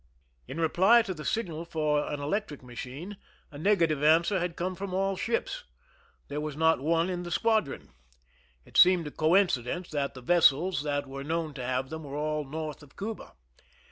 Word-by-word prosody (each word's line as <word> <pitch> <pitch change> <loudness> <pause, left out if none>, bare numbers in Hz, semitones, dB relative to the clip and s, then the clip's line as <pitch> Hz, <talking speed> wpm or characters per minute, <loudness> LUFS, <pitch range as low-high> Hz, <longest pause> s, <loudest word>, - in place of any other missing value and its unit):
In 155 - -6
reply 190 +8 +5
to 190 - -4
the 155 -3 -8
signal 165 - -2
for 155 -3 0
an 145 - -3
electric 150 -1 -3
machine, 130 +10 -8 0.3
a 145 - -9
negative 165 -5 +2
answer 165 +6 +4
had 175 -1 -2
come 185 +2 -2
from 190 0 -5
all 195 0 +1
ships. 235 - -2 0.6
There 145 +1 -4
was 150 -1 -5
not 160 -1 +3
one 165 +3 +2
in 180 -1 -3
the 175 - -6
squadron. 220 - 0 0.7
It - - -6
seemed 180 -2 +7
a 150 - -5
coinci 160 -4 +3
dence 175 +8 -5
that 140 -3 -2
the 130 - -9
vessels 170 +3 +4
that 145 -1 -1
were 135 0 -7
known 160 0 -2
to 130 -3 -6
have 130 +2 -2
them 160 0 -6
were 140 -1 -7
all 150 0 -1
north 155 +1 -5
of 145 -1 -17
Cuba. 215 +2 -6
160 Hz, 185 wpm, -29 LUFS, 145-185 Hz, 0.7 s, seemed